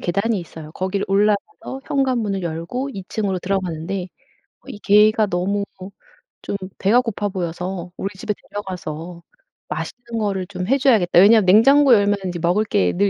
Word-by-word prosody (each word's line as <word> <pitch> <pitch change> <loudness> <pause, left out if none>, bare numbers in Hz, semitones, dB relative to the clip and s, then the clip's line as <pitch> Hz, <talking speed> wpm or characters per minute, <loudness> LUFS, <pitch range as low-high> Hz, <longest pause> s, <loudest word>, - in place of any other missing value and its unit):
계단이 200 +5 0
있어요. 160 -2 -11
거기를 190 +3 -2
올라가서 210 - 0
현관문을 235 -8 0
열고 170 +12 -4
2 195 -2 -7
층으로 200 -4 -2
들어가는데 185 0 -3 0.6
이 205 - -8
개가 215 +2 +4
너무 195 +3 -1 0.8
좀 200 - -3 0.2
배가 225 +6 +4
고파 215 -3 -3
보여서 180 0 -4
'우리 195 - -3
집에 210 - -2 0.2
데려가서 175 -4 -6 0.5
맛있는 235 -2 -5
거를 195 -3 -1
좀 180 -1 -5
해 270 - +3
줘야겠다.' 225 -11 +4
왜냐하면 210 +1 +6
냉장고 270 +7 +6
열면 205 0 +2 0.3
먹을 180 +5 +2
게 90 - +1
늘 200 +2 +2
200 Hz, 330 characters per minute, -21 LUFS, 180-215 Hz, 0.8 s, 왜냐하면